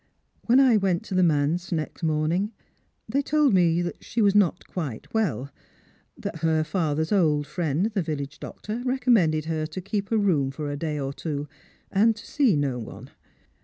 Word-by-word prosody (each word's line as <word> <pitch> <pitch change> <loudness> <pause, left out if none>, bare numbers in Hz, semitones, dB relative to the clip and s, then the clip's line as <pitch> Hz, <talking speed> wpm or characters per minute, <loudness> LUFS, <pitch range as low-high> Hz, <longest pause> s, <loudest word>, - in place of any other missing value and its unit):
When 245 +3 +6
I 255 -5 +6
went 190 -4 +1
to - - -7
the 185 - +3
manse 165 +2 +1
next 160 -1 -3
morning, 160 +6 0 0.6
they 270 +6 +1
told 295 -3 +2
me 175 -2 +3
that 175 - -6
she 235 - -4
was 200 -3 +4
not 195 -4 +2
quite 145 -11 -6
well 160 - -1 0.3
— - - -36
that - - -4
her 160 0 +2
father's 160 -2 -1
old 155 -7 +3
friend, 155 +2 -1
the 200 - +1
village 145 -3 -4
doctor, 220 +3 -6
recommended 230 - +2
her 160 -1 -2
to 160 +4 -6
keep 200 +2 -3
her 225 - +2
room 170 -10 +2
for 145 +1 -4
a - - -3
day 150 0 -3
or 135 0 -3
two, 145 -1 -4 0.4
and 220 +3 +4
to 210 - -12
see 265 - +2
no 140 -4 0
one. 110 - -9
170 Hz, 185 wpm, -25 LUFS, 150-205 Hz, 0.6 s, When